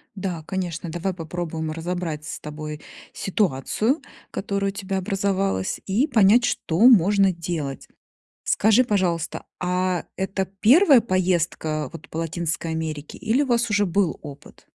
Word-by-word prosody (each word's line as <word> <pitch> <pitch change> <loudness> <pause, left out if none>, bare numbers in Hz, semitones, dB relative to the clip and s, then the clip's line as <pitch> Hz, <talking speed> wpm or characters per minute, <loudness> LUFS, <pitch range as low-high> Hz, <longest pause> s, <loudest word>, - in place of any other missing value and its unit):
Да, 180 -4 -4
конечно, 175 -3 -3
давай 175 +3 -2
попробуем 160 -2 -4
разобрать 165 -2 -4
с - - -6
тобой 150 0 -7 0.3
ситуацию, 210 - 0 0.3
которая 200 0 -2
у - - -19
тебя 195 -1 -3
образовалась, 195 - -1
и 225 +10 +1
понять, 225 -1 +5
что 165 +2 -1
можно 200 -4 +6
делать. 165 -5 -4 0.6
Скажи, 220 +4 +4
пожалуйста, 180 -7 -1 0.2
а 180 0 0
это 190 0 -2
1 275 - +6
поездка 170 - 0
вот - - -10
по 160 - -6
Латинской 165 0 -2
Америке 155 -2 -4
или 230 +6 +1
у - - -2
вас 235 -1 +2
уже 205 -1 +2
был 180 -2 0
опыт? 145 -2 -12
180 Hz, 135 wpm, -23 LUFS, 160-200 Hz, 0.6 s, можно